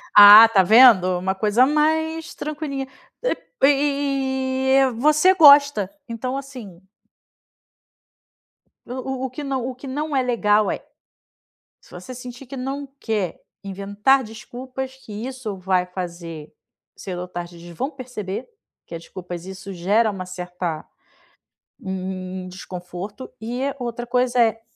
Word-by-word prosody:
Ah, 205 +2 +11
tá 215 -4 +4
vendo? 190 -3 +6
Uma 190 +2 -1
coisa 210 +5 +3
mais 320 +3 0
tranquilinha. 290 -3 -5 0.4
E - - 0 0.3
e - - +7
e 270 -2 +1
e - - -6
você 305 +9 +4
gosta. 285 - +6 0.2
Então 250 +3 -4
assim 245 -10 -10 2.0
o - - -10
o 260 0 -4
o - - -3
que 275 +4 -7
não 265 -3 -2
o 260 - -5
que 260 +2 -11
não 295 +3 -3
é 265 - +3
legal 215 -4 +2
é - - -6 0.9
se - - -23
você 255 - -9
sentir 250 +1 -10
que 270 - -8
não 275 +2 -4
quer 205 -7 -2 0.2
inventar 200 +7 +1
desculpas, 255 +4 -8
que 265 -5 -13
isso 255 -6 -6
vai 185 -1 0
fazer 170 -4 -7 0.5
cedo 180 -2 -6
ou 180 - -6
tarde, 175 -1 -7
eles 170 0 -12
vão 270 +4 -2
perceber 250 - -6 0.4
que 170 - -8
as 165 - -8
desculpas 175 -2 -8
isso 190 +1 -8
gera 205 +6 +2
uma 190 -2 -6
certa 180 -3 -5 1.0
um 190 - -5
um 185 0 -5
um - - -8
desconforto. 185 +5 -8
E 245 +4 -3
a 280 - -2
outra 240 -1 -4
coisa 250 0 +1
é 225 -1 +2
235 Hz, 145 wpm, -22 LUFS, 190-265 Hz, 2.0 s, Ah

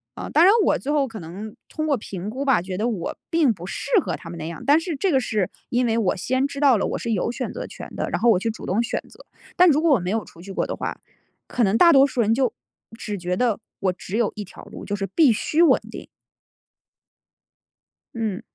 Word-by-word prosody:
啊 - - -6
当 325 - +4
然 395 - +7
我 - - +3
最 285 - -3
后 290 -2 +2
可 225 -3 -8
能 195 +6 -8
通 310 - -4
过 285 - +2
评 195 -3 -6
估 265 +5 -4
吧， 265 -10 +3
觉 185 0 -5
得 220 +3 0
我 210 -8 -3
并 310 -8 +3
不 175 -2 -10
适 - - -5
合 - - -3
他 165 - -10
们 170 - -7
那 155 - -5
样， 170 -1 -7
但 290 +3 +5
是 330 -1 -4
这 360 +6 0
个 270 - +4
是 215 -6 -1 0.2
因 245 +1 +1
为 225 -1 +1
我 215 -5 +1
先 260 +8 0
知 280 0 -7
道 270 -6 +5
了 - - 0
我 - - -2
是 235 - -3
有 215 +3 0
选 - - -4
择 - - -6
权 - - -9
的， - - -2
然 - - -1
后 240 - +5
我 195 -5 +5
去 225 - -1
主 220 - -7
动 205 +5 +1
选 - - -2
择。 - - -17 0.3
但 360 0 +6
如 305 0 +3
果 330 - +3
我 260 - +5
没 180 +2 -3
有 225 -1 0
出 165 - -15
去 195 +2 -9
过 - - 0
的 - - -4
话， - - -4 0.5
可 245 - 0
能 205 +2 +3
大 340 - +7
多 275 -2 +6
数 255 -3 -1
人 220 +1 +3
就 255 -1 +1 0.4
只 210 -3 -4
觉 180 0 -2
得， 230 +1 +1 0.2
我 185 -2 0
只 190 +3 -5
有 235 -3 +1
一 210 - -5
条 185 - -13
路， - - -10
就 205 - -2
是 200 -1 -3
必 275 - +4
须 310 +9 0
稳 340 - +6
定。 - - -9 2.1
嗯。 220 -4 -2
230 Hz, 275 characters per minute, -23 LUFS, 195-275 Hz, 2.1 s, 然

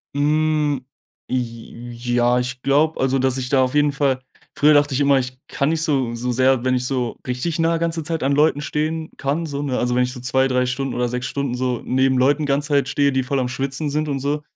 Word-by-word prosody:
Hm, 150 -2 +1 0.4
j 120 -1 -5 0.2
ja 120 0 +3
ich 125 0 -4
glaube 150 +4 +2
also, 135 0 +1
dass 130 0 +1
ich 125 -1 -3
da 135 -1 +3
auf 130 +2 -2
jeden 145 0 +3
Fall 140 -2 0 0.4
früher 150 +1 +5
dachte 145 -1 +3
ich 135 - 0
immer: 140 -1 +4
„Ich 130 0 -5
kann 140 - -1
nicht 160 0 0
so 135 -7 0
so 125 +2 -2
sehr 130 0 +2
wenn 130 0 +1
ich 125 0 0
so 125 -3 -2
richtig 140 +7 -2
nah 165 0 +2
ganze 165 0 -1
Zeit 160 -1 -3
an 135 - +1
Leuten 145 0 +3
stehen 155 +1 -2
kann 145 +5 -1
so 140 -2 -4
ne?“ 135 -3 -2
Also, 125 0 0
wenn 125 0 +3
ich 125 0 -2
so 125 - -9
2 130 +1 +2
3 125 -1 +1
Stunden 130 +1 -2
oder 125 0 -1
6 125 +1 -3
Stunden 140 -2 -2
so 125 -1 -1
neben 130 +1 +2
Leuten 145 +4 +2
ganze 145 +2 0
Zeit 140 -2 +2
stehe, 140 +1 +2
die 130 -1 0
voll 135 +2 -1
am 125 -1 -1
Schwitzen 135 +4 -3
sind 155 +2 -1
und 140 -2 -2
so. 145 +2 -1
135 Hz, 240 wpm, -21 LUFS, 125-145 Hz, 0.4 s, früher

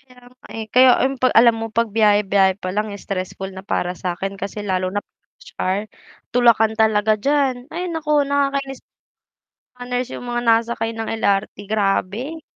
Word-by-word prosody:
Kaya 250 -1 -20
nga, 255 - -19
eh. 225 -1 -5
Kaya 255 +1 +7
ay 260 - +3
'pag 255 0 +2
alam 230 0 +6
mo 225 - -3
pagbiyahe-biyahe 205 -3 +2
pa 185 - -4
lang 210 0 -2
stressful 195 0 -5
na 190 +1 -10
para 180 -2 -2
sa'kin 190 +2 -4
kasi 200 +2 -6
lalo 185 -2 -2
na 205 - -1
'pag - - -35 0.2
rush - - -15
hour, 190 +2 0 0.5
tulakan 230 -3 +4
talaga 215 -1 +3
diyan. 270 0 0
Ay 360 +2 -3
naku, 300 -3 +1
nakakainis. 275 -1 -1 0.9
Mga 245 0 -10
nurse 250 0 -2
yung 245 - -9
mga 240 0 -2
nasakay 230 0 +1
ng 225 0 -5 0.2
LRT, 200 +1 +1
grabe. 215 - -1
225 Hz, 165 wpm, -20 LUFS, 200-250 Hz, 0.9 s, Kaya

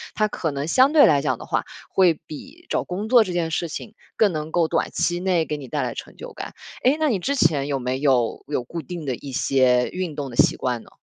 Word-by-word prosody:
它 215 0 +2
可 165 -6 -3
能 140 +1 -3
相 260 - +4
对 305 -2 +8
来 145 -3 +4
讲 130 -4 0
的 - - -10
话， - - -1 0.3
会 180 -4 +3
比 275 - -11
找 - - 0
工 195 +4 -4
作 245 -2 +7
这 185 - -5
件 170 -2 -1
事 170 +2 -1
情 210 +7 -7 0.2
更 215 -3 +4
能 155 -1 -4
够 170 -1 +2
短 165 - 0
期 175 0 0
内 180 -3 +1
给 150 - -3
你 140 -3 -9
带 - - -2
来 - - -2
成 - - -9
就 - - -9
感。 - - -7 0.3
诶， 265 +4 +4
那 310 -1 +2
你 215 -7 0
之 280 +10 -1
前 145 - +2
有 140 -2 -1
没 130 +1 -2
有 130 -5 +1
有 140 -4 -2
固 165 +7 -6
定 165 +1 -7
的 130 -3 -1
一 140 +3 -9
些 125 -1 +2
运 180 -4 -4
动 145 -2 -4
的 120 - -9
习 - - +4
惯 125 -3 -2
呢？ - - -18
160 Hz, 275 characters per minute, -23 LUFS, 135-190 Hz, 0.3 s, 对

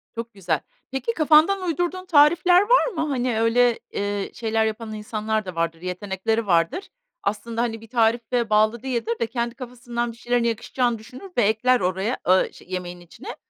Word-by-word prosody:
Çok 230 0 -6
güzel. 175 -6 -1 0.3
Peki, 270 - -2
kafandan 320 +5 +4
uydurduğun 350 +2 -2
tarifler 345 +4 +5
var 485 +5 +4
mı? 315 -10 -2
Hani 250 -4 0
öyle, 235 +1 +3
eee, 205 0 -2
şeyler 225 -1 0
yapan 220 0 -4
insanlar 215 0 -2
da 185 -2 -7
vardır, 165 0 -2
yetenekleri 190 +4 -2
vardır. 170 - +1 0.3
Aslında 230 +3 -2
hani 225 -2 -2
bir 225 - -14
tarife 230 0 +1
bağlı 215 +2 +3
değildir 235 -3 -2
de, 230 - +1
kendi 235 0 -3
kafasından 240 -2 -5
bir - - -16
şeylerin 245 0 0
yakışacağını 235 +1 -1
düşünür 255 - -12
ve 240 - +4
ekler 220 +4 +3
oraya 190 +6 -1
a 185 +1 +3
şe - - -16
yemeğin 180 -1 -5
içine. 170 -1 -10
230 Hz, 170 wpm, -23 LUFS, 210-255 Hz, 0.3 s, tarifler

